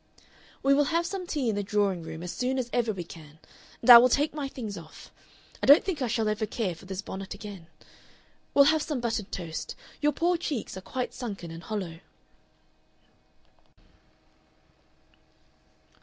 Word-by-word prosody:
"We 275 +1 +5
will 290 +1 +4
have 335 +3 +1
some 365 0 -4
tea 290 -7 -1
in 225 - +2
the 205 - 0
drawing 200 -3 0
room 160 +1 -7
as 180 - -4
soon 255 +1 -1
as 245 -2 -3
ever 235 -2 +1
we 190 -4 -5
can 160 -2 -13 0.5
and 230 - 0
I 235 - +14
will 250 +2 +5
take 290 +5 +2
my 295 -2 -3
things 225 -6 -6
off. 165 -3 -12 0.5
I - - -1
don't 285 +3 +9
think 360 -7 -3
I 255 - +1
shall 225 -1 0
ever 215 0 -1
care 210 -4 -2
for 170 - -14
this 190 +1 -5
bonnet 195 0 -6
again. 200 -5 -9 0.9
We'll 280 - +8
have 315 - +1
some 295 -3 -2
buttered 225 -4 -2
toast. 165 -3 -5 0.3
Your 295 0 +3
poor 345 +3 +1
cheeks 295 - -4
are 190 - -7
quite 250 +6 -4
sunken 200 -9 -6
and 165 0 -8
hollow...." 185 -6 -5
220 Hz, 170 wpm, -28 LUFS, 190-275 Hz, 0.9 s, I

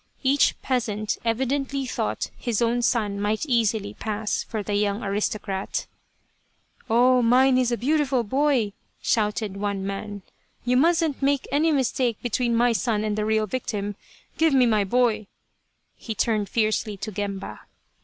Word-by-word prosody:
Each 275 +2 +3
peasant 215 -5 -1
evidently 265 +4 -1
thought - - -3
his 235 -5 -2
own 235 +1 +1
son 210 -4 0
might 210 +6 0
easily 225 -6 +1
pass 215 -1 -2
for 215 -2 -4
the 205 - -3
young 205 +1 0
aristocrat! 200 -1 -2 0.5
" - - -36
Oh, 250 +2 +5
mine 255 +3 +4
is 250 -1 +1
a 240 - 0
beautiful 275 -1 +1
boy," 260 -3 +1 0.3
shouted 210 -2 0
one 200 -1 -2
man. 200 0 -5 0.2
" - - -39
You 250 +1 +2
mustn't 325 +1 +2
make 275 0 +1
any 310 +3 +3
mistake 255 -4 +1
between 240 0 0
my 240 +1 +4
son 220 -2 0
and 210 -1 -1
the 210 0 -1
real 220 0 +2
victim. 205 -3 -3 0.4
Give 320 -3 +4
me 255 -2 +5
my 215 -3 +3
boy 225 0 +1 0.4
" - - -48 0.3
he 220 - -6
turned 210 -2 0
fiercely 215 -2 0
to 215 +3 -5
Gemba. 200 -1 -5
230 Hz, 155 wpm, -24 LUFS, 210-255 Hz, 0.5 s, Oh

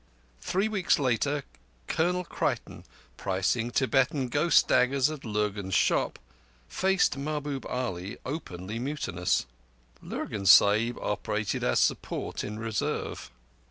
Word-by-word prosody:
Three 190 - 0
weeks 200 -5 +2
later, 140 +2 0 0.4
Colonel 180 +3 +1
Creighton, - - -3 0.3
pricing 95 +5 0
Tibetan 130 +1 +1
ghost 170 +7 +4
daggers 135 +3 +3
at 155 -3 -7
Lurgan's 105 -3 -2
shop, - - +2 0.5
faced 190 -7 +1
Mahbub 145 -1 -3
Ali 100 -6 -4
openly 110 - -5
mutinous. 100 - -1 0.6
Lurgan 100 -2 -4
Sahib 110 +5 +6
operated 105 0 -2
as 60 - +2
support - - -1
in 105 +1 -5
reserve. 110 - -3
125 Hz, 105 wpm, -28 LUFS, 105-145 Hz, 0.6 s, Sahib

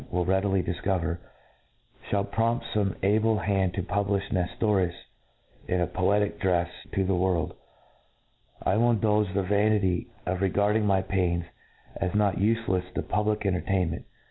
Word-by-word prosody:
will 90 0 0
readily 95 0 +1
difcovcr, 90 -1 -1 0.9
Ihall 100 -1 0
prompt 115 +1 0
fome 100 -3 0
able 110 +2 +3
hand 95 -1 0
to 95 - -1
publifh 100 +1 -1
Ncftorius 95 -1 +1 0.7
in 90 -1 +1
a 90 - +2
poetical 100 +5 0
drcfe 90 -3 +1 0.2
to 95 - +1
the 95 - +1
world, 90 -2 0 1.1
I - - +2
C^^ill 120 +3 +3
indulge 105 -2 +2
the 100 - +2
vanity 100 -2 +2 0.2
of 90 +1 -2
regard 100 +2 +2
ing 110 -1 +2
my 95 -1 +3
pains 90 -3 0 0.5
as 95 +1 -2
not 105 -3 +2
ufelcfs 100 -3 0
to - - -1
public 105 0 0
entertain 90 -2 +1
ment. 80 - -6
95 Hz, 145 wpm, -27 LUFS, 90-105 Hz, 1.1 s, able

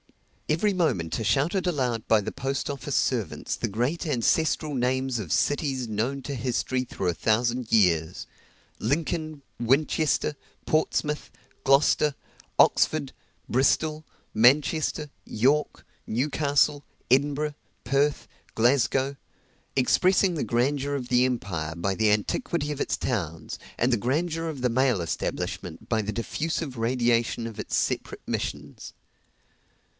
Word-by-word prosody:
Every 185 +7 +2
moment 95 - 0
are 115 - -3
shouted 145 - +1
aloud 125 -10 -1
by 110 - +6
the 100 - -4
post 135 +1 -3
office 140 -2 -3
servants - - -1
the - - -2
great 125 - -1
ancestral 155 +3 +1
names 130 0 0
of 90 -8 -6
cities 135 -4 0
known 120 +6 -2
to 140 +2 -4
history 125 +1 -1
through 100 -6 -4
a 90 - +2
thousand 120 +5 0
years, 85 -5 +2 0.5
Lincoln, 155 +3 -2 0.2
Winchester, 150 +4 +1 0.3
Portsmouth, 150 -1 0 0.3
Gloucester, 140 +1 +4 0.4
Oxford, 145 -4 +3 0.3
Bristol, 155 +5 +1 0.3
Manchester, 145 +5 +3
York, 140 +7 0 0.2
Newcastle, 145 +3 +1 0.3
Edinburgh, 145 +3 +2 0.3
Perth, 140 +4 +1 0.3
Glasgow 135 +3 +2 0.6
expressing 185 +8 +3
the 155 - -2
grandeur 135 +5 0
of 130 -3 -4
the 125 0 +4
empire 90 -11 -2
by 95 +3 -1
the 110 0 +3
antiquity 150 - -1
of 145 - -6
its - - 0
towns, 85 - -3 0.2
and 120 +2 +2
the - - +3
grandeur 165 +8 -1
of 145 -5 -6
the 125 - +2
mail 125 -3 +2
establishment 85 -2 -4
by 110 - +1
the 105 0 -3
diffusive 145 +5 -3
radiation 120 -1 +1
of 115 - -9
its - - -2
separate - - -2
missions. - - -4
130 Hz, 125 wpm, -26 LUFS, 115-150 Hz, 0.6 s, by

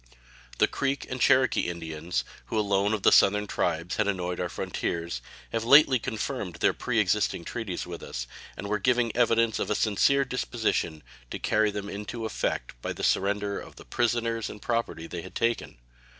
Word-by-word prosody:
The - - +5
Creek 140 -1 -1
and 130 -1 -3
Cherokee 130 -8 +4
Indians, 80 0 -3 0.2
who 110 - -3
alone 100 0 +2
of 100 - -7
the - - +6
Southern 105 +1 +5
tribes 85 -3 -1
had 110 - +2
annoyed 90 -3 -2
our 90 - -1
frontiers, 85 -7 -3 0.3
have 115 -1 -1
lately 135 +1 +7
confirmed 110 -5 -3
their 85 - +2
preexisting 105 -6 0
treaties 110 -7 -4
with 85 -1 -7
us, - - -5 0.3
and 100 - -6
were 105 +1 0
giving 120 +1 +2
evidence 115 -1 +3
of - - -2
a 105 - +1
sincere 135 +7 +3
disposition 110 - -1 0.3
to - - -4
carry 110 0 +2
them 100 -1 -4
into 105 +3 -5
effect 80 - -2
by - - -3
the - - -7
surrender 100 +1 +1
of - - -11
the - - -13
prisoners 115 -1 0
and 105 - -9
property 115 -7 -2
they 85 0 -6
had 95 - -11
taken. 115 - -1
105 Hz, 175 wpm, -27 LUFS, 90-115 Hz, 0.3 s, lately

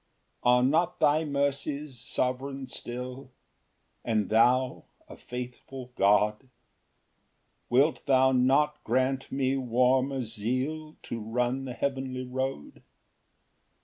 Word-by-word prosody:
4 125 - +4
Are 125 0 +4
not 165 +7 +2
thy 155 0 +3
mercies 140 -1 -2
sovereign 130 +3 -2
still? 125 +1 -6 0.7
And 110 -4 0
thou 125 +4 +3 0.2
a - - -11
faithful 125 +1 -8
God? 105 +5 +2 1.2
Wilt 140 +6 +3
thou 130 -1 +5
not 135 +4 +2
grant 130 +3 0
me 135 0 0
warmer 130 +1 +1
zeal 130 +8 -3
To 115 - -5
run 120 +4 -1
the 125 - -5
heavenly 130 -1 -3
road? 130 - -4
130 Hz, 105 wpm, -28 LUFS, 125-135 Hz, 1.2 s, thou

